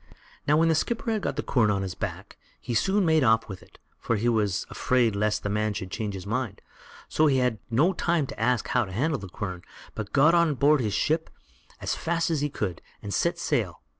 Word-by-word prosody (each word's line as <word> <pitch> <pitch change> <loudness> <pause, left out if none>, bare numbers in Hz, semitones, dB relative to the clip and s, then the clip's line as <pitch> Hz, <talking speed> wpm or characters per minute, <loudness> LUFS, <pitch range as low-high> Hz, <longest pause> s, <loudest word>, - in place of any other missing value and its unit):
Now, 150 +1 +4
when 165 +1 +4
the 165 - +4
skipper 225 +8 -1
had 215 -2 0
got - - -2
the - - -2
quern 115 -5 +2
on 100 -1 0
his 95 -2 -4
back, - - -6 0.2
he 120 - -5
soon 190 - +2
made 160 -3 +4
off 115 -1 +3
with 95 -3 -8
it, - - -19 0.2
for 115 - 0
he 110 +3 0
was 105 -5 +1
afraid 120 -4 +1
lest 105 +1 0
the - - -1
man 105 0 0
should 95 -1 -5
change 105 -3 -3
his 95 - -7
mind; 115 0 -2 0.5
so 155 - +3
he 135 -2 +3
had 125 -4 +1
no 150 +11 +3
time 170 -5 +1
to - - -9
ask 120 +1 +1
how 125 - +2
to 95 - -10
handle 135 - 0
the 95 - -8
quern, 90 -1 -5 0.3
but 105 -1 -6
got 150 +4 +5
on 170 -3 +3
board 145 +1 +4
his 105 -3 -1
ship 160 +6 0 0.5
as - - -2
fast 165 0 -1
as 155 -3 0
he 145 - 0
could, 95 - -4 0.2
and 100 -1 -4
set - - +1
sail. - - -1
120 Hz, 230 wpm, -26 LUFS, 105-155 Hz, 0.5 s, got